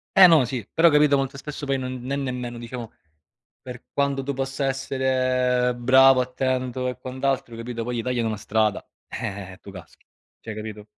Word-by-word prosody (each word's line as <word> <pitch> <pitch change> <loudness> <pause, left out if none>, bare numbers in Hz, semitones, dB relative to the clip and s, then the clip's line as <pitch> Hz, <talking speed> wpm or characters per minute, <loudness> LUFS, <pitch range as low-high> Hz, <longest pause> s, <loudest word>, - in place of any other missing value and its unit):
Eh, 195 -1 +10
no, 160 -7 +6
sì, 120 -4 -5
però 165 +1 +6
capito, 150 -1 +4
molto 135 +1 -2
spesso 145 +1 -7
poi 135 -1 +1
non 130 -1 -5
ne 130 +3 -3
nemmeno, 125 -3 -4
diciamo, 120 -1 -7 0.7
per 125 -1 -9
quanto 140 -1 0
tu 140 - -2
possa 135 +1 -2
essere 130 -2 +1
bravo, 130 +1 +6
attento 130 0 -2
e 125 -1 -4
quant'altro, 130 -2 -2
capito, 115 0 -5
poi 120 0 -3
gli 115 - -2
tagliano 120 -2 -1
la 110 - -3
strada, 110 +1 0 0.2
eh-eh, 95 -1 -6
e - - -14
tu 100 - -12
caschi. 90 -3 -14 0.3
Cioè, 110 - -7
capito? 105 -1 -8
125 Hz, 180 wpm, -24 LUFS, 120-135 Hz, 0.7 s, Eh